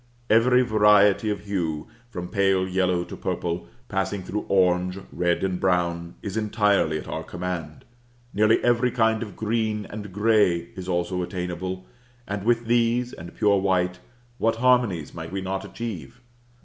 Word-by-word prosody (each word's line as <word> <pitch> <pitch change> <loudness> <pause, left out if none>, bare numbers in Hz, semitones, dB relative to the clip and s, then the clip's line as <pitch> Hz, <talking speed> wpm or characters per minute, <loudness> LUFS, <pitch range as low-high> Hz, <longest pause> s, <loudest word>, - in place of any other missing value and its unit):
Every 125 +3 +5
variety 105 -2 +4
of 105 - -2
hue, 85 -7 -3 0.2
from 90 -6 -6
pale 95 -2 +2
yellow 90 -1 +1
to - - -8
purple, 85 0 -3 0.2
passing 95 -1 -2
through 105 +3 -4
orange, 90 -1 +2 0.2
red, 90 0 0
and 95 -2 -1
brown, 85 -2 0
is 100 -3 -4
entirely 105 -7 +2
at - - -8
our - - -4
command; 90 -4 -5 0.5
nearly 110 +2 +4
every 120 +1 +3
kind 110 -2 +1
of 105 -5 -6
green 110 -1 -1
and 105 -1 -7
gray 105 -5 +2
is 95 0 -7
also 90 +1 -1
attainable: 90 +1 -4 0.4
and 100 -1 -3
with 120 +1 +2
these, 120 +1 +1
and 85 +1 -10
pure 100 -1 +3
white, 90 -1 0 0.4
what 115 0 +2
harmonies 120 - +2
might 80 -1 -7
we 95 - -2
not 95 0 -3
achieve? 100 - -7
95 Hz, 150 wpm, -25 LUFS, 90-110 Hz, 0.5 s, Every